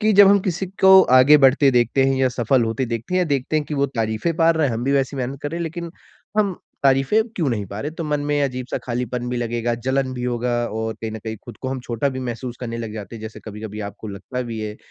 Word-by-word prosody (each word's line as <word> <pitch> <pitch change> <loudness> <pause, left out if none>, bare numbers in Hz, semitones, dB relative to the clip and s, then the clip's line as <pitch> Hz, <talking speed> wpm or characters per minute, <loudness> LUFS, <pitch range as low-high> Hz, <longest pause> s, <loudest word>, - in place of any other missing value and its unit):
कि 215 0 +3
जब 200 0 +8
हम 200 - +6
किसी 185 0 -2 0.2
को 190 0 +9 0.2
आगे 145 +4 +7
बढ़ते 140 +1 +3
देखते 125 +2 +2
हैं 135 0 +2
या 130 -1 +3
सफल 125 0 +1
होते 120 +3 -1
देखते 115 +9 -4
हैं - - +3
या - - +3
देखते 135 +4 -1
हैं 150 - 0
कि 150 - -5
वो 140 0 +2
तारीफ़ें 115 +4 -1
पा 165 0 +5
रहा 160 -3 +2
है, 125 - -1
हम 115 +2 -3
भी 140 - +1
वैसी 135 0 0
मेहनत 130 +2 -4
कर 145 - -3
रहे 170 - -4
हैं - - -2
लेकिन 170 +1 -5 0.5
हम 200 -4 +1 0.2
तारीफ़ें 135 +11 +3
क्यों 160 -7 +1
नहीं 105 -4 -2
पा 100 +3 -7
रहे? 150 - -3
तो 165 0 -6
मन 150 -1 -1
में 145 0 0
अजीब-सा 130 -2 -2
खालीपन 125 0 -3
भी 125 - -2
लगेगा, 120 0 -1
जलन 130 +2 -1
भी 125 0 -4
होगा 125 0 -1 0.2
और 110 0 -2
कहीं 110 -1 -4
न 110 - -5
कहीं 110 0 -6
खुद - - -10
को 130 - -2
हम 130 -1 -3
छोटा 120 +3 -1
भी 130 -1 -4
महसूस 120 0 -5
करने 115 -1 -4
लग 115 -2 -5
जाते 110 +1 -7
हैं, - - -10
जैसे 110 0 -8
कभी-कभी 105 0 -7
आपको 105 +1 -10
लगता 105 +6 -5
भी 115 -2 -5
है। 105 0 -5
130 Hz, 270 wpm, -21 LUFS, 115-145 Hz, 0.5 s, को